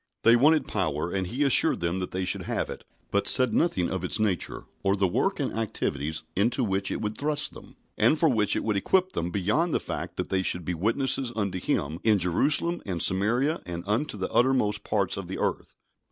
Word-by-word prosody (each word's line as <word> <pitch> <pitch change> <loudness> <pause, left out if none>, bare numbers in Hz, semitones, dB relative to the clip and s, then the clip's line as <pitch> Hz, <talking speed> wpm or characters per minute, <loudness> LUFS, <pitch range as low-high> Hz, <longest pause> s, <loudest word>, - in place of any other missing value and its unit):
They 115 +1 +7
wanted 145 +3 +4
power, 85 -4 -1
and 95 -2 -1
He 125 +9 -1
assured 135 -3 +4
them 85 +2 -1
that 90 - -3
they 95 0 -3
should - - -2
have - - -2
it, - - -9 0.3
but - - +1
said 130 -2 +4
nothing 95 - +1
of 95 -1 -3
its 90 - -1
nature, 105 -4 -1 0.2
or 95 0 +2
the 100 -1 +2
work 90 - 0
and - - -2
activities 80 -9 -2
into 120 +6 +2
which 100 -2 0
it - - -3
would 105 0 -3
thrust 150 +3 0
them, - - -13 0.2
and 160 - +4
for 165 - +3
which 110 -7 +2
it - - -1
would 105 -2 0
equip 185 - +2
them, 85 +1 -2
beyond 105 - 0
the - - +2
fact - - -6
that - - -3
they 95 -1 +1
should 90 -2 -1
be 90 - -1
witnesses 120 - 0
unto 100 -4 -2
Him 80 -2 -2
"in 110 -2 +4
Jerusalem 140 - +1
and 90 -4 -3
Samaria, 120 - +1
and 85 -1 -5
unto 110 +4 -1
the 95 - -4
uttermost 115 -5 +2
parts 100 -4 0
of 100 -3 -6
the 95 - -5
earth." - - -3
105 Hz, 215 wpm, -26 LUFS, 90-130 Hz, 0.3 s, They